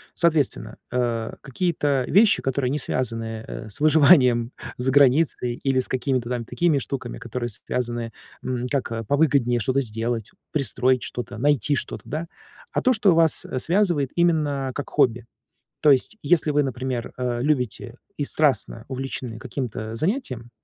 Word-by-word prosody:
Соответственно, 150 Hz, -9 st, +1 dB
э, 120 Hz, -2 st, -1 dB
какие-то 145 Hz, -3 st, 0 dB
вещи, 210 Hz, +2 st, +4 dB
которые 135 Hz, -1 st, -1 dB
не 145 Hz, -, 0 dB
связаны, 115 Hz, -4 st, -2 dB
э, 110 Hz, -, -7 dB
с 100 Hz, -, -6 dB
выживанием 140 Hz, -6 st, +5 dB, 0.2 s
за 130 Hz, +2 st, 0 dB
границей 135 Hz, -3 st, +3 dB
или 135 Hz, +1 st, 0 dB
с -, -, -3 dB
какими-то 130 Hz, -2 st, -1 dB
там 120 Hz, -2 st, -2 dB
такими 170 Hz, +4 st, +1 dB
штуками, 130 Hz, -2 st, -4 dB
которые 120 Hz, +1 st, -4 dB
связаны, 120 Hz, +1 st, -3 dB, 0.3 s
м, 125 Hz, -1 st, -2 dB
как 115 Hz, -5 st, -2 dB
повыгоднее 140 Hz, -5 st, +2 dB
что-то 130 Hz, +4 st, +1 dB
сделать, 115 Hz, -1 st, -3 dB, 0.2 s
пристроить 130 Hz, -2 st, +2 dB
что-то, 120 Hz, -4 st, -6 dB
найти 145 Hz, +1 st, +2 dB
что-то, -, -, -4 dB
да. 155 Hz, +3 st, -4 dB, 0.4 s
А -, -, 0 dB
то, 255 Hz, -, +4 dB
что 210 Hz, -5 st, +4 dB
вас, 165 Hz, -1 st, +3 dB
э, 130 Hz, -, -3 dB
связывает 170 Hz, -4 st, +1 dB
именно 150 Hz, -6 st, +1 dB
как 145 Hz, -, -5 dB
хобби. 120 Hz, -5 st, +2 dB, 0.6 s
То 150 Hz, -, +6 dB
есть, 135 Hz, +10 st, 0 dB
если 155 Hz, +1 st, +2 dB
вы, 145 Hz, 0 st, +3 dB
например, 130 Hz, -2 st, -3 dB
э, 125 Hz, -2 st, -2 dB
любите 130 Hz, -5 st, -1 dB, 0.2 s
и 145 Hz, -, -1 dB
страстно 135 Hz, -7 st, 0 dB
увлечены 130 Hz, -3 st, -5 dB
каким-то 115 Hz, -3 st, -5 dB
занятием, 130 Hz, -, -2 dB
130 Hz, 150 wpm, -23 LUFS, 120-145 Hz, 0.6 s, То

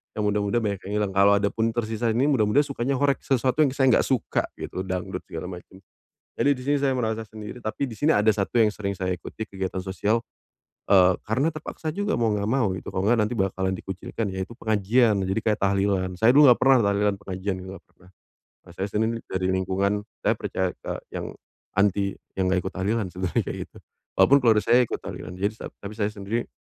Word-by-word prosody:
Yang 105 Hz, -, -1 dB
muda-muda 100 Hz, +1 st, 0 dB
banyak 100 Hz, -3 st, -1 dB
yang -, -, -5 dB
hilang, 100 Hz, -2 st, -1 dB
kalau 100 Hz, +1 st, +6 dB
adapun 110 Hz, +3 st, 0 dB
tersisa 115 Hz, 0 st, -1 dB
ini 125 Hz, +6 st, +2 dB
muda-muda 125 Hz, -3 st, +3 dB
sukanya 135 Hz, -1 st, -2 dB
horeg, 140 Hz, -1 st, +3 dB
sesuatu 130 Hz, +1 st, +1 dB
yang 140 Hz, -, +2 dB
saya 135 Hz, -1 st, +3 dB
enggak -, -, +4 dB
suka 130 Hz, -4 st, 0 dB, 0.2 s
gitu, 95 Hz, -, -4 dB
dangdut 90 Hz, -1 st, -4 dB
segala 85 Hz, +2 st, -6 dB
macem. 90 Hz, +1 st, -11 dB, 0.6 s
Jadi -, -, +4 dB
di 130 Hz, -, -9 dB
sini 145 Hz, +2 st, +2 dB
saya 135 Hz, -1 st, +1 dB
merasa 110 Hz, -3 st, -1 dB
sendiri, 110 Hz, +2 st, -9 dB
tapi 110 Hz, +4 st, -3 dB
di 115 Hz, -, -8 dB
sini 150 Hz, +6 st, +3 dB
ada 105 Hz, +2 st, +4 dB
satu 105 Hz, +3 st, +1 dB
yang 110 Hz, -, +5 dB
sering 100 Hz, -1 st, -3 dB
saya 95 Hz, -1 st, -2 dB
ikuti 110 Hz, +5 st, -7 dB
kegiatan 95 Hz, -1 st, -4 dB
sosial. 105 Hz, +4 st, 0 dB, 0.7 s
Eee, 95 Hz, -2 st, +5 dB
karena 130 Hz, +9 st, +2 dB
terpaksa 155 Hz, +1 st, -5 dB
juga 205 Hz, +2 st, -1 dB
mau 115 Hz, -2 st, +1 dB
enggak 100 Hz, -1 st, -1 dB
mau 120 Hz, -4 st, +2 dB
gitu -, -, -10 dB
kalau 95 Hz, -, 0 dB
enggak 120 Hz, -, +4 dB
nanti 105 Hz, +3 st, 0 dB
bakalan 95 Hz, -1 st, 0 dB
dikucilkan 95 Hz, +3 st, -5 dB
yaitu 95 Hz, +4 st, -5 dB
pengajian. 110 Hz, +1 st, +2 dB
Jadi 95 Hz, +4 st, 0 dB
kayak 105 Hz, -2 st, +1 dB
tahlilan, 95 Hz, -1 st, +1 dB
saya 110 Hz, +3 st, +5 dB
dulu 145 Hz, +2 st, +7 dB
enggak 120 Hz, -, +5 dB
pernah 135 Hz, 0 st, +6 dB
tahlilan 100 Hz, 0 st, +2 dB
pengajian 95 Hz, 0 st, -3 dB
gitu 95 Hz, -, -9 dB
ga -, -, -15 dB
pernah. 90 Hz, -, -23 dB, 0.5 s
Kalo 90 Hz, -, -15 dB
saya 95 Hz, +2 st, -2 dB
Senin 110 Hz, +3 st, 0 dB
dari 95 Hz, 0 st, -1 dB
lingkungan 95 Hz, +2 st, 0 dB, 0.2 s
saya -, -, +3 dB
percaya 95 Hz, -1 st, -2 dB
ke -, -, -6 dB, 0.2 s
yang -, -, -4 dB, 0.4 s
anti 100 Hz, 0 st, +2 dB, 0.2 s
yang 95 Hz, -, +2 dB
enggak 95 Hz, -1 st, +1 dB
ikut 95 Hz, -, -4 dB
tahlilan 100 Hz, +2 st, 0 dB
sebenernya 90 Hz, -1 st, -1 dB
kayak -, -, -4 dB
gitu. -, -, -18 dB, 0.4 s
Walaupun 140 Hz, -, +6 dB
keluarga 110 Hz, -3 st, +4 dB
saya 120 Hz, +2 st, +5 dB
ikut -, -, -4 dB
tahlilan 90 Hz, -, -7 dB
jadi 100 Hz, +3 st, -1 dB
sa -, -, -6 dB, 0.2 s
tapi 100 Hz, -, -5 dB
saya 105 Hz, -2 st, 0 dB
sendiri 105 Hz, +3 st, -3 dB
105 Hz, 205 wpm, -25 LUFS, 95-120 Hz, 0.7 s, dulu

